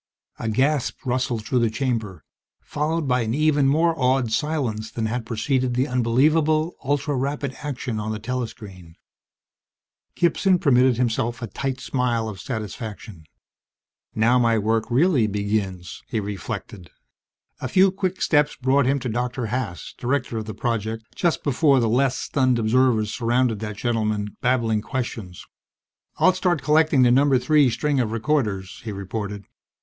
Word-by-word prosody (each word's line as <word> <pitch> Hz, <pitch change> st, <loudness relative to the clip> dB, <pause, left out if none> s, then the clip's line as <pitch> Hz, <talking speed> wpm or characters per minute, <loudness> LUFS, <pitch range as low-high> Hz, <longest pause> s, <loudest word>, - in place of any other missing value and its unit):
_ -, -, -7 dB
A 115 Hz, -, -1 dB
gasp 135 Hz, +4 st, 0 dB
rustled 125 Hz, -3 st, -1 dB
through 125 Hz, -, +1 dB
the 115 Hz, -1 st, +2 dB
chamber, 110 Hz, -5 st, -3 dB, 0.4 s
followed 155 Hz, +1 st, -2 dB
by 125 Hz, -1 st, +2 dB
an 115 Hz, +1 st, -1 dB
even 150 Hz, -2 st, +3 dB
more 165 Hz, +4 st, +3 dB
awed 130 Hz, -4 st, +1 dB
silence 120 Hz, -7 st, -1 dB
than 110 Hz, 0 st, -3 dB
had 115 Hz, +1 st, -3 dB
preceded 125 Hz, +2 st, 0 dB
the 130 Hz, +3 st, +1 dB
unbelievable, 150 Hz, +6 st, +2 dB
ultra 145 Hz, +1 st, 0 dB
rapid 140 Hz, +1 st, -2 dB
action 130 Hz, -6 st, -4 dB
on 105 Hz, +1 st, -3 dB
the 110 Hz, -, -3 dB
telescreen. 105 Hz, -7 st, -6 dB, 1.2 s
Gibson 180 Hz, +2 st, +2 dB
permitted 130 Hz, -, +3 dB
himself 120 Hz, -1 st, -1 dB
a -, -, -4 dB
tight 130 Hz, +2 st, -4 dB
smile 120 Hz, -5 st, -1 dB
of 100 Hz, -4 st, -7 dB
satisfaction. 110 Hz, -, -6 dB, 0.9 s
Now 115 Hz, +3 st, +3 dB
my 115 Hz, -2 st, +3 dB
work 110 Hz, +1 st, 0 dB
really 130 Hz, -2 st, +3 dB
begins, 100 Hz, -4 st, -3 dB
he 110 Hz, -, -2 dB
reflected. 100 Hz, -3 st, -6 dB, 0.7 s
A -, -, -3 dB
few 190 Hz, +8 st, +4 dB
quick 185 Hz, -1 st, -2 dB
steps 145 Hz, -2 st, +2 dB
brought 130 Hz, 0 st, +2 dB
him 140 Hz, +1 st, +2 dB
to 125 Hz, -, -3 dB
Dr. 125 Hz, +1 st, -2 dB
Haas, 110 Hz, -, -4 dB
director 125 Hz, -3 st, -1 dB
of 110 Hz, -, -6 dB
the 110 Hz, -2 st, -7 dB
project, 110 Hz, -1 st, -2 dB
just 170 Hz, -3 st, 0 dB
before 140 Hz, -1 st, +3 dB
the 115 Hz, -, +1 dB
less 130 Hz, +3 st, +2 dB
stunned 130 Hz, -3 st, +1 dB
observers 115 Hz, -1 st, +2 dB
surrounded 120 Hz, -2 st, +1 dB
that 105 Hz, -1 st, -5 dB
gentleman, 110 Hz, -3 st, -1 dB
babbling 115 Hz, -4 st, +1 dB
questions. 110 Hz, -8 st, -5 dB, 0.7 s
"I'll 185 Hz, -, +5 dB
start 180 Hz, -3 st, 0 dB
collecting 150 Hz, -3 st, +4 dB
the 120 Hz, -, +5 dB
Number 135 Hz, +1 st, +4 dB
Three 140 Hz, +2 st, +3 dB
string 140 Hz, +4 st, 0 dB
of 115 Hz, -4 st, 0 dB
recorders," 110 Hz, -6 st, -1 dB
he 110 Hz, -, -5 dB
reported. 100 Hz, +1 st, -5 dB
125 Hz, 150 wpm, -23 LUFS, 110-140 Hz, 1.2 s, I'll